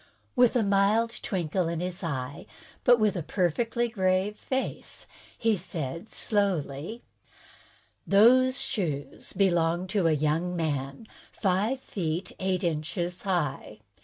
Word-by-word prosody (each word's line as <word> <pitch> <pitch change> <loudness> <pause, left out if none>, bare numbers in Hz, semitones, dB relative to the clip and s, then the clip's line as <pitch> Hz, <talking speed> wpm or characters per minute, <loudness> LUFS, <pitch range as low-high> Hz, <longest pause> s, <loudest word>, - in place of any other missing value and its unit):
With 245 -1 +5
a 240 - +3
mild 205 +4 +2
twinkle 180 -2 -1
in 165 -1 -2
his 180 +1 -4
eye, 135 -4 -4 0.4
but 245 -1 +6
with 215 -1 +2
a 175 - -1
perfectly 225 +8 0
grave 190 -2 +1
face, 260 +4 -4 0.3
he 225 -1 +2
said 170 0 -5
slowly: 195 - -1 1.0
"Those 255 +6 +5
shoes 175 - -3
belong 175 -2 +2
to 190 -3 +2
a - - +4
young 155 +4 0
man, 145 - -2 0.3
five 210 +7 0
feet 175 -3 -3
eight 190 0 0
inches 170 +2 -2
high. 150 - -2
185 Hz, 120 wpm, -28 LUFS, 165-215 Hz, 1.0 s, but